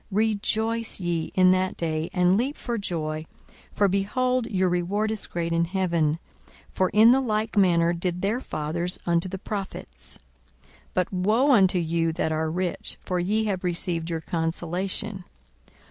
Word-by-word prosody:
42:006:023 190 - -2
Rejoice 220 +1 0
ye 170 -3 -2
in 185 -1 +6
that 185 0 +1
day, 160 -1 -2
and 180 0 +3
leap 260 +7 0
for 235 -2 -3
joy: 155 -5 -3 0.5
for, 205 - +2
behold, 240 +6 0
your 190 -4 +1
reward 185 +5 0
is 220 - 0
great 170 -1 -3
in 170 0 +2
heaven: 170 -4 +1 0.5
for 185 -1 +1
in 220 +2 +7
the 265 +2 +4
like 220 -2 -1
manner 170 -4 +4
did 175 +1 -3
their 215 +5 +1
fathers 170 - -2
unto 170 +1 +1
the 190 - -4
prophets. 195 0 -6 0.5
42:006:024 - - -27 0.2
But 185 +1 0
woe 215 +10 +3
unto 190 -7 +5
you 165 -1 0
that 160 - -1
are 160 0 0
rich! 180 +2 -3
for 180 -1 -2
ye 210 +5 +1
have 190 -3 -2
received 170 -1 -1
your 165 -1 -2
consolation. 180 +5 -3
185 Hz, 160 wpm, -25 LUFS, 170-210 Hz, 0.5 s, in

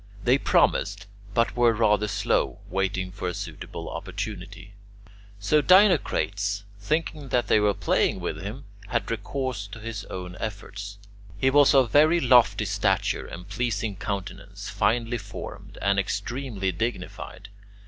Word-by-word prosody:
They 125 +3 +4
promised, - - +2 0.3
but 115 0 +2
were 120 -1 +4
rather 105 -1 +2
slow, 100 - 0
waiting 95 -1 -1
for 95 -1 -5
a 90 - -2
suitable 90 -6 -7
opportunity. 100 -1 -6 0.7
So 125 +10 +3
Dinocrates, 115 - +3 0.2
thinking 150 +3 -2
that 125 -1 +2
they - - +4
were 105 -1 +2
playing - - +1
with 75 - -4
him, 110 +8 -6 0.2
had 115 -4 -1
recourse 115 -1 -3
to 105 +2 -10
his 110 -2 -6
own 90 -1 -7
efforts. 100 -1 -6 0.4
He 130 +6 +2
was 145 0 +6
of 130 -4 +4
very 155 +4 +5
lofty 120 -6 +4
stature 100 -1 0
and 90 +2 -9
pleasing 105 -1 -2
countenance, 100 -1 -5
finely 120 +1 +1
formed, 100 -1 -9
and 100 0 +3
extremely 100 0 -2
dignified. 90 +1 -5
105 Hz, 135 wpm, -26 LUFS, 100-120 Hz, 0.7 s, was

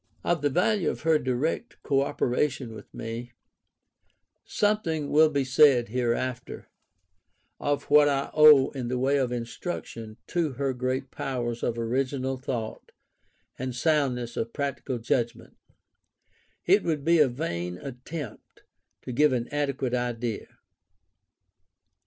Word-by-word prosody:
Of 175 -1 +1
the 145 - +2
value 180 +5 +2
of - - -5
her 160 -1 +3
direct 135 - -2
cooperation 135 -2 0
with 105 -2 -12
me, 115 +2 -6 1.1
something 170 -8 0
will 155 +1 +6
be 140 -2 0
said 130 -3 +5
hereafter, 125 +1 -2 0.9
of 145 0 -1
what 145 0 +5
I 140 -1 -1
owe 150 -3 +7
in 130 -4 -4
the 125 +1 -1
way 135 +3 +2
of 130 -3 0
instruction 115 -2 -5
to 165 -5 -1
her 135 +1 -1
great 130 +1 -2
powers 120 -3 -3
of 115 - -1
original 130 +3 -1
thought 125 -4 -5 0.7
and 130 -1 -3
soundness 125 -5 0
of 115 +1 -3
practical 140 -2 -3
judgment, 115 +1 -2 1.1
it 195 +4 +5
would 150 -4 -1
be 170 0 +4
a 150 - +6
vain 90 - -4
attempt 135 - -8 0.4
to - - -6
give 150 +4 +4
an 120 -1 -1
adequate 140 -3 -1
idea]. 120 -2 -2
130 Hz, 125 wpm, -27 LUFS, 120-145 Hz, 1.1 s, owe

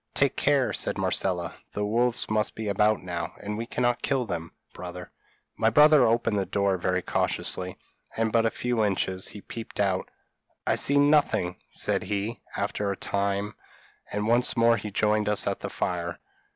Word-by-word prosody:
'Take 140 -2 +2
care,' 140 -3 +2
said - - 0
Marcella, 90 -4 0 0.2
'the 105 - -1
wolves 120 +3 +1
must 105 0 0
be 110 -1 -4
about 105 +1 +2
now, 85 -2 -4
and 105 +1 -4
we 115 +2 -4
cannot 120 -1 0
kill 135 -3 0
them, 85 -5 -5 0.2
brother.' 90 0 -8 0.4
My 110 - +3
brother 150 +3 +6
opened 115 -2 +1
the 95 - -1
door 100 -1 +1
very 90 +1 0
cautiously, 90 -1 -1 0.4
and 110 -1 +1
but 115 +1 +3
a 115 - +3
few 120 -1 -1
inches: 95 -2 0
he 105 - -6
peeped 115 +2 -8
out. 95 -2 0 0.6
'I - - +2
see 140 - +2
nothing,' 145 -11 +3
said - - -1
he, 105 +3 -3 0.2
after 105 -1 -1
a 95 - -4
time, 100 +1 -1 0.6
and 105 +1 -2
once 120 +2 +3
more 115 0 +5
he 110 - -5
joined 105 +1 +1
us 105 -1 +2
at - - -1
the - - -5
fire. 85 -1 -3
105 Hz, 175 wpm, -27 LUFS, 95-115 Hz, 0.6 s, brother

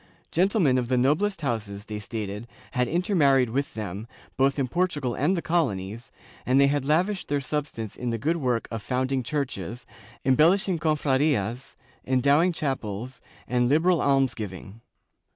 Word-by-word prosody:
Gentlemen 175 - +3
of 120 - -2
the 125 0 +1
noblest 160 +9 +1
houses, 105 -6 -3
they 105 -1 -5
stated, 105 +1 -5 0.2
had 125 -2 0
intermarried 145 - +3
with 140 +3 -2
them, 105 0 -5 0.3
both 135 +1 +2
in 135 -2 0
Portugal 145 -5 -1
and 160 +10 +1
the 170 - -3
colonies, 115 - -1 0.3
and 130 +2 +3
they 140 - +6
had 140 0 +1
lavished 180 +7 +1
their 145 0 0
substance 140 -6 -4
in 125 - -3
the 115 - -1
good 160 +9 0
work 125 -6 -1
of 115 -2 -4
founding 130 +3 -1
churches, 125 - -4 0.4
embellishing 165 +7 +3
cofradias, 135 -6 0 0.3
endowing 140 +7 +3
chapels, 125 - -4 0.3
and 125 0 +1
liberal 160 +3 +3
almsgiving. 115 -7 -1
130 Hz, 145 wpm, -26 LUFS, 115-155 Hz, 0.4 s, they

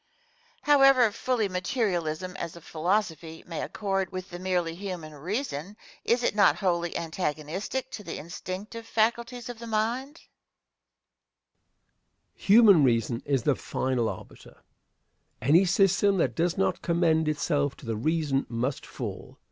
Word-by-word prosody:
Question. 295 - +4
However 265 -5 +6
fully 235 0 0
materialism, 180 -3 -2
as 170 -1 -5
a 170 - -11
philosophy, 165 -1 -2
may 165 -2 -5
accord 195 -3 -2
with 185 0 -6
the 175 - -7
merely 180 -3 -1
human 175 -4 -6
reason, 185 - -4 0.3
is 240 +1 +1
it - - +2
not 205 -1 +5
wholly 175 -4 -1
antagonistic 170 - -3
to 210 - -7
the 170 - -6
instinctive 190 +7 -7
faculties 235 +2 0
of 240 -2 -7
the 235 - -8
mind? 225 +4 0 0.2
Answer. - - -26 2.1
Human 200 -6 +6
reason 115 -1 +1
is 135 -4 +1
the 145 - +3
final 130 -3 -1
arbiter. - - -11 0.8
Any 160 - +4
system 195 +1 +3
that 170 - +1
does 170 +1 0
not 190 -2 0
commend 160 -2 +2
itself 145 -2 0
to - - -13
the 115 -1 -2
reason 145 +2 0
must 125 +4 -3
fall. - - -7
180 Hz, 140 wpm, -27 LUFS, 155-210 Hz, 2.1 s, However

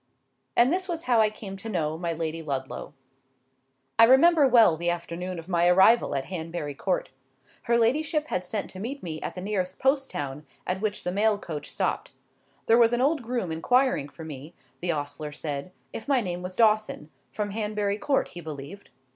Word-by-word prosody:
And 250 +6 +5
this 370 +1 0
was 335 -1 -3
how 245 -7 +3
I 215 - +4
came 210 -2 -8
to 225 +4 -7
know 160 -6 -1
my 170 +1 -2
Lady 165 0 -3
Ludlow. 140 -1 -5 1.0
I 230 - +10
remember 285 +4 +6
well 230 -9 +6
the 170 +2 -1
afternoon 175 +1 -4
of 165 0 -8
my 175 -2 +2
arrival 190 0 +5
at 135 -1 -2
Hanbury 165 -4 -4
Court. - - -2 0.6
Her 235 - +5
ladyship 300 +6 +1
had 180 - -1
sent 205 +3 -3
to 185 - -9
meet 260 +8 -5
me 160 -3 -5
at - - -5
the 180 - -5
nearest 185 -2 -2
post 270 +1 +1
town 140 +1 -5 0.2
at 185 +1 -2
which 210 -1 -1
the 180 - -1
mail 210 +2 +2
coach 160 -7 -6
stopped. - - -2 0.5
There 230 +1 +5
was 235 0 +5
an 240 - +1
old 290 +2 +2
groom 235 -7 -3
inquiring 165 - +2
for 160 - -11
me, 150 +1 -9 0.2
the 175 0 0
ostler 150 0 -4
said, 145 +2 -5 0.2
if 225 - -7
my 275 -2 +3
name 180 -5 -3
was 180 0 -6
Dawson—from 210 - 0
Hanbury 210 -1 -1
Court, 275 +5 +1
he 175 - -8
believed. 155 +5 -8
190 Hz, 190 wpm, -26 LUFS, 160-235 Hz, 1.0 s, I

